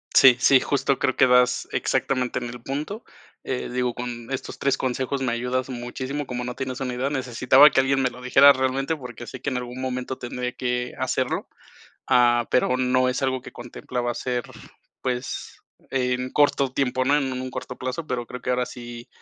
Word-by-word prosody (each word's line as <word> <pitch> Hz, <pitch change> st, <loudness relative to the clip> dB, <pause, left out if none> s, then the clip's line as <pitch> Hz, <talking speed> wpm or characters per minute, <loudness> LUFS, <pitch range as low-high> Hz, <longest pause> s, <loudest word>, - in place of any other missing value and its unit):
Sí, 135 Hz, -3 st, +8 dB
sí, 135 Hz, +1 st, +6 dB
justo 140 Hz, 0 st, 0 dB
creo 130 Hz, -, +1 dB
que -, -, +6 dB
das 125 Hz, 0 st, +3 dB
exactamente 130 Hz, -2 st, 0 dB
en 125 Hz, -, -3 dB
el 120 Hz, 0 st, -9 dB
punto. 150 Hz, -, -4 dB, 0.4 s
Eh, 130 Hz, -, -3 dB
digo, 125 Hz, -1 st, 0 dB
con 120 Hz, 0 st, -6 dB
estos 135 Hz, -, -5 dB
3 140 Hz, -1 st, +1 dB
consejos 130 Hz, +1 st, -2 dB
me 125 Hz, -, 0 dB
ayudas 125 Hz, +2 st, -2 dB
muchísimo, 130 Hz, +3 st, -4 dB
como 125 Hz, -1 st, -4 dB
no 125 Hz, 0 st, -4 dB
tienes 130 Hz, -1 st, -4 dB
una 125 Hz, -1 st, -2 dB
idea, 130 Hz, +3 st, -1 dB
necesitaba 130 Hz, +1 st, +5 dB
que -, -, +3 dB
alguien 135 Hz, +1 st, +2 dB
me 130 Hz, -2 st, +1 dB
lo 125 Hz, +1 st, -12 dB
dijera 135 Hz, +3 st, +7 dB
realmente 130 Hz, +3 st, 0 dB
porque 125 Hz, -4 st, -9 dB
sé 130 Hz, -, -9 dB
que -, -, -1 dB
en 130 Hz, -, -2 dB
algún 125 Hz, +1 st, -6 dB
momento 130 Hz, 0 st, -3 dB
tendría 125 Hz, 0 st, -4 dB
que 125 Hz, 0 st, -2 dB
hacerlo, -, -, -1 dB, 0.6 s
ah, 120 Hz, -1 st, +4 dB
pero 125 Hz, 0 st, +2 dB
no 130 Hz, 0 st, +2 dB
es 130 Hz, +2 st, -2 dB
algo 130 Hz, -1 st, 0 dB
que -, -, -11 dB
contemplaba 120 Hz, 0 st, -4 dB
hacer, 125 Hz, 0 st, -2 dB, 0.6 s
pues 125 Hz, 0 st, -4 dB, 0.4 s
en 125 Hz, -1 st, 0 dB
corto 140 Hz, -2 st, +2 dB
tiempo, 130 Hz, -1 st, 0 dB
¿no?, 140 Hz, +2 st, +4 dB
en 135 Hz, -3 st, -1 dB
un 130 Hz, 0 st, -4 dB
corto 125 Hz, 0 st, -7 dB
plazo, 130 Hz, +5 st, -4 dB
pero 125 Hz, -4 st, -3 dB
creo 125 Hz, -1 st, -8 dB
que -, -, -4 dB
ahora 125 Hz, 0 st, +1 dB
sí, 120 Hz, -1 st, -9 dB
125 Hz, 195 wpm, -24 LUFS, 125-130 Hz, 0.6 s, Sí